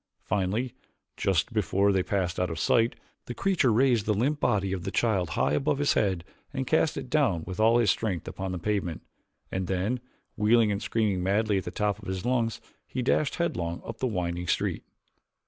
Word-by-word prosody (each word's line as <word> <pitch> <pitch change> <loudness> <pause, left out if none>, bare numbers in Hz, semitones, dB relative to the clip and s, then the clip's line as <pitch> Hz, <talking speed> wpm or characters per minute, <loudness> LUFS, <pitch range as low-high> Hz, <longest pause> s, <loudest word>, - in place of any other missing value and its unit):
Finally, 105 +6 -1 0.4
just 95 +5 0
before 100 -1 +2
they 95 -1 +2
passed 90 -2 -1
out 90 - +1
of 80 - -4
sight 115 +8 +2 0.3
the 120 - -5
creature 185 -11 +2
raised 120 -2 +3
the 105 - +2
limp 140 +8 +1
body 95 -2 +1
of 90 -3 -4
the - - -2
child 100 -7 +1
high 65 +2 +2
above 140 - +1
his 145 0 +2
head 95 -5 +1 0.3
and 135 -2 -2
cast 155 +3 +2
it 130 - -5
down 125 - +1
with 95 +2 -6
all 115 +2 +5
his 115 -5 +4
strength 95 -7 -2
upon 95 0 -4
the 90 - -3
pavement, 90 -2 -2 0.5
and 95 -1 -2
then, 95 +7 0 0.4
wheeling 110 0 +4
and 100 +1 -2
screaming 105 -5 0
madly 100 +2 +2
at 90 - -8
the - - -3
top 105 +2 -1
of 100 - -10
his 95 -1 -3
lungs, 120 -3 0 0.3
he 125 - -3
dashed 140 +3 +1
headlong 85 - -2
up 115 0 -7
the 130 - 0
winding 90 -4 -2
street. - - 0
105 Hz, 200 wpm, -28 LUFS, 95-120 Hz, 0.5 s, all